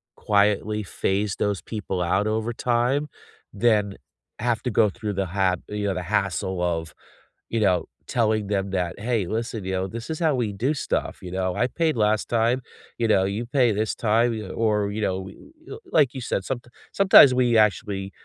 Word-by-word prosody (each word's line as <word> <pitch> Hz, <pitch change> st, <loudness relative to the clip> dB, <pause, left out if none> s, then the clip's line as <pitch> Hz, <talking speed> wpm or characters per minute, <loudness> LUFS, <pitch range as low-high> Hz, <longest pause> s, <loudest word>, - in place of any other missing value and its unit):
quietly 105 Hz, +1 st, +1 dB
phase 100 Hz, +1 st, -1 dB
those 100 Hz, -2 st, 0 dB
people 95 Hz, -4 st, -4 dB
out 95 Hz, +4 st, +1 dB
over 110 Hz, +2 st, -1 dB
time, 125 Hz, +5 st, 0 dB, 0.5 s
than 105 Hz, -2 st, +2 dB, 0.4 s
have 115 Hz, -1 st, 0 dB
to 125 Hz, -, -1 dB
go 105 Hz, 0 st, +4 dB
through 105 Hz, -2 st, -4 dB
the 95 Hz, 0 st, -1 dB
hap 95 Hz, -1 st, 0 dB
you 105 Hz, 0 st, -2 dB
know, 100 Hz, -, 0 dB
the 90 Hz, -, -3 dB
hassle 95 Hz, -2 st, -1 dB
of, 85 Hz, -2 st, -2 dB, 0.6 s
you 115 Hz, -, -1 dB
know, 90 Hz, -5 st, +2 dB, 0.2 s
telling 110 Hz, -3 st, +1 dB
them 100 Hz, -1 st, -1 dB
that, 90 Hz, -2 st, -2 dB
"Hey. 110 Hz, -5 st, -1 dB
Listen, 110 Hz, -1 st, -3 dB
you 95 Hz, -, -3 dB
know, 95 Hz, 0 st, -1 dB
this 115 Hz, -, -7 dB
is 160 Hz, -, -3 dB
how 160 Hz, -3 st, +2 dB
we 115 Hz, -4 st, -1 dB
do 125 Hz, +9 st, 0 dB
stuff, 145 Hz, -, -2 dB
you 90 Hz, -, -8 dB
know, 95 Hz, -1 st, -1 dB
I 125 Hz, -, +1 dB
paid 160 Hz, +1 st, 0 dB
last 105 Hz, 0 st, +1 dB
time, 120 Hz, +2 st, +1 dB, 0.4 s
you 115 Hz, -, +1 dB
know, 100 Hz, -3 st, +3 dB
you 100 Hz, +5 st, -3 dB
pay 125 Hz, -1 st, +2 dB
this 105 Hz, +1 st, -1 dB
time, 115 Hz, +2 st, +2 dB
you 110 Hz, -3 st, -5 dB
know, 95 Hz, -, -7 dB
or, 105 Hz, -2 st, +1 dB
you 110 Hz, -, -4 dB
know, 95 Hz, -2 st, -1 dB
y 95 Hz, 0 st, -9 dB, 0.3 s
you" 425 Hz, -, -8 dB
like 145 Hz, -6 st, +3 dB
you 130 Hz, -, -5 dB
said, 105 Hz, -, -1 dB
someti 120 Hz, +2 st, -5 dB, 0.2 s
sometimes 190 Hz, -9 st, +8 dB
we 125 Hz, -2 st, +2 dB
actually 100 Hz, -2 st, +1 dB
105 Hz, 195 wpm, -24 LUFS, 95-120 Hz, 0.6 s, sometimes